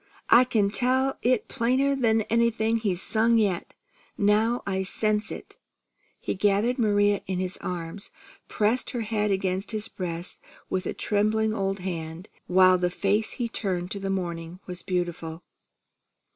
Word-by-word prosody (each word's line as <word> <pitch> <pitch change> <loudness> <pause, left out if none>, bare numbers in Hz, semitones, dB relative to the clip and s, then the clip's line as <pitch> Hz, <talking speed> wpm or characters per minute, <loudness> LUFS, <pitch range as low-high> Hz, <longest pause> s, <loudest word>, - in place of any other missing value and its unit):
I 250 +2 +8
can 210 -5 +1
tell 260 +3 +2
it 250 -2 +1
plainer'n 250 -2 +2
anything 230 0 +1
he's 195 -5 -2
sung 230 +1 +3
yet, 200 -6 0 0.4
now 215 +4 +2
I 190 -1 -1
sense 210 +2 -1
it." - - -9 0.6
He - - -2
gathered 205 +6 +1
Maria 205 -2 +3
in 185 -1 -2
his 185 0 -2
arms, 175 +2 -5 0.4
pressed 220 +4 +1
her 245 -3 -3
head 210 -1 -1
against 190 +1 -1
his 215 0 -1
breast 175 -1 -5 0.3
with 185 0 -1
a - - -3
trembling 215 +1 +1
old 195 -2 -2
hand, 170 0 -5 0.2
while 185 0 +5
the 180 0 +1
face 205 +4 0
he 240 - -2
turned 185 -5 -3
to 200 - -4
the 195 0 -3
morning 170 -2 -4
was 180 -1 -6
beautiful. 175 -2 -3
205 Hz, 145 wpm, -26 LUFS, 185-225 Hz, 0.6 s, I